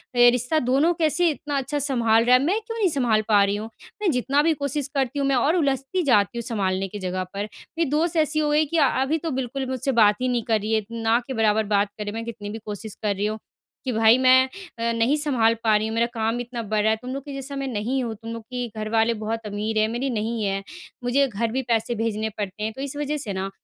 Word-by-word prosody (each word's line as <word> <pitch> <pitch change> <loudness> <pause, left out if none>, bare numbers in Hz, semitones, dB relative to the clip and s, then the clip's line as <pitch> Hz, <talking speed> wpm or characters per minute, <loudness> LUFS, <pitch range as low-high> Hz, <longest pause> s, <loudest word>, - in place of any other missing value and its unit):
ए 245 0 +7
रिश्ता, 250 +6 +1
दोनों 280 +6 +2
कैसे 335 +1 +2
इतना 290 -1 -3
अच्छा 275 +2 -2
संभाल 235 -5 +2
रहा 250 +1 +6
है, 255 - +4
मैं 385 +8 +1
क्यों 455 +1 -7
नहीं 395 -4 +3
संभाल 245 -8 +2
पा 205 -2 +5
रही 200 +1 +1
हूँ? 215 +2 -5 0.3
मैं 385 -6 +2
जितना 275 +3 +1
भी 325 +2 +3
कोशिश 280 0 0
करती 270 +1 0
हूँ, 275 - +1
मैं 275 - +2
और 285 +7 +2
उलझती 275 +3 0
जाती 225 - +2
हूँ, 235 - -2
संभालने 195 -3 -1
की 205 +2 -7
जगह 185 0 -2
पर। 200 +1 -2
मेरी 320 +8 -5
दोस्त 320 +4 +1
ऐसी 310 +1 0
हो 300 -1 +1
गई 305 +1 +3
कि 330 +3 -2
अभी 275 +1 +2
तो 320 - -1
बिल्कुल 265 +1 -3
मुझसे 260 +1 -1
बात 210 -1 +6
ही 255 - +1
नहीं 240 -2 0
कर 225 -2 +1
रही 215 +1 -2
है, 220 -1 +2
ना 230 0 +1
के 265 - -4
बराबर 220 -2 +2
बात 200 0 +1
कर 210 - -4
रही 205 - -4
है। - - -8
मैं 230 0 -4
कितनी 210 -3 -7
भी 220 - -5
कोशिश 210 0 -6
कर 205 -1 +1
रही 200 +2 -1
हूँ 215 +1 -2 0.5
कि, 255 - 0
"भाई, 225 +1 +5
मैं 260 0 +5 0.3
अ, 230 0 0
नहीं 230 +5 +2
संभाल 255 -7 +3
पा 220 -2 +4
रही 215 +1 +1
हूँ, 220 - -4
मेरा 230 +1 +2
काम 225 +1 -1
इतना 240 -1 -5
बढ़ 215 0 0
रहा 220 - +3
है, 220 - +1
तुम 255 +1 -6
लोग 275 0 -5
के 285 - -7
जैसा 275 +1 -6
मैं 275 0 -3
नहीं 250 +3 -1
हूँ। 230 -2 -3
तुम 225 +2 -8
लोग 230 -1 -7
की 245 +1 -4
घर 215 0 -3
वाले 225 +1 +2
बहुत 225 +1 -3
अमीर 210 +2 -3
हैं, 215 - +3
मेरी 240 +4 -2
नहीं 225 -1 -2
हैं। 195 0 -1 0.4
मुझे 270 +3 +2
घर 230 -1 -2
भी 265 +3 -1
पैसे 230 +1 +1
भेजने 220 -1 -1
पड़ते 205 0 -4
हैं।" 220 +1 -2
तो 265 - -8
इस 280 0 -4
वजह 295 +1 -2
से 220 -8 -4
ना, 190 +1 -3
235 Hz, 270 wpm, -24 LUFS, 220-275 Hz, 0.5 s, ए